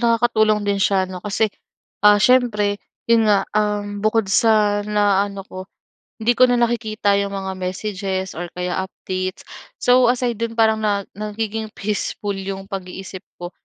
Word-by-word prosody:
nakakatulong 220 -3 +2
din 200 -1 0
siya, 195 -1 +3
'no? 185 -1 -8
Kasi, 210 +2 0 0.5
ah, 210 0 +7
siyempre 210 -4 +3 0.3
yun 230 -1 +4
nga, 200 -2 +4
um, 205 -1 -1
bukod 215 -1 +2
sa 210 -1 +3
na-ano 205 -1 +1
ko, 185 - -9 0.6
hindi 225 +2 +2
ko 255 - +6
na 245 - +2
nakikita 220 -4 +1
yung 200 0 -2
mga 190 -1 -4
messages 190 0 -3
or 175 0 -4
kaya 180 0 -3
updates. 185 0 -5 0.4
So, 250 0 +5
aside 245 -2 -1
doon 230 0 -2
parang 220 -1 +3
na 205 -1 +1
nagiging 215 +1 -4
peaceful 205 0 -3
yung 195 0 -6
pag-iisip 190 -1 -7 0.2
ko. 175 0 -5
205 Hz, 150 wpm, -20 LUFS, 195-220 Hz, 0.6 s, ah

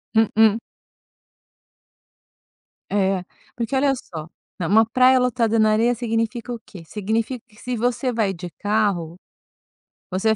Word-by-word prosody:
Mm-mm. 220 0 +4 2.3
É, 190 -2 +1 0.3
porque 235 +2 -3
olha 270 +1 +3
só, 160 -10 -8 0.3
né, 170 - -1
uma 220 +5 +5
praia 255 +3 +5
lotada 240 -3 +2
na 215 -1 +4
areia 230 +3 +3
significa 230 +1 -2
o 240 - -4
quê? 190 -6 -13
Significa 220 - -2
que 220 - -24
se 245 +2 -4
você 245 +2 0
vai 220 -5 0
de 175 0 -7
carro, 205 -6 0 0.9
você 190 +4 0
vai 220 - +4
225 Hz, 135 wpm, -22 LUFS, 205-240 Hz, 2.3 s, uma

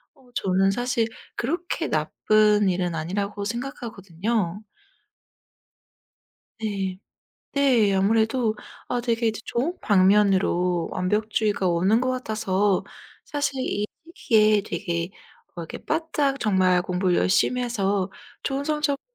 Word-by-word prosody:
어 255 -2 -22
저는 195 -1 +2
사실 240 +1 0 0.3
그렇게 330 +5 -2
나쁜 210 +6 +3
일은 180 -2 -1
아니라고 200 +5 -3
생각하거든요. 210 - -3 2.0
네. 195 -4 -3 0.5
네. 255 -8 +3
아무래도 220 +3 +2 0.3
아 245 - 0
되게 230 -1 0
좋 215 - -7
좋은 310 +10 -2
방면으로 190 -3 +3
완벽주의가 210 +1 0
오는 185 +6 +3
것 255 +1 0
같아서 210 -6 0 0.4
사실 290 -1 -1
이 205 +1 -1 0.3
시기에 215 -3 +4
되게 170 -4 -3 0.5
어 170 - -4
이렇게 165 - -9
바짝 310 -4 0
정말 185 -5 +3
공부를 180 0 0
열심히 215 +6 +2
해서 200 -5 0 0.4
좋은 270 0 -1
성적 300 -1 0
210 Hz, 240 characters per minute, -24 LUFS, 190-240 Hz, 2.0 s, 시기에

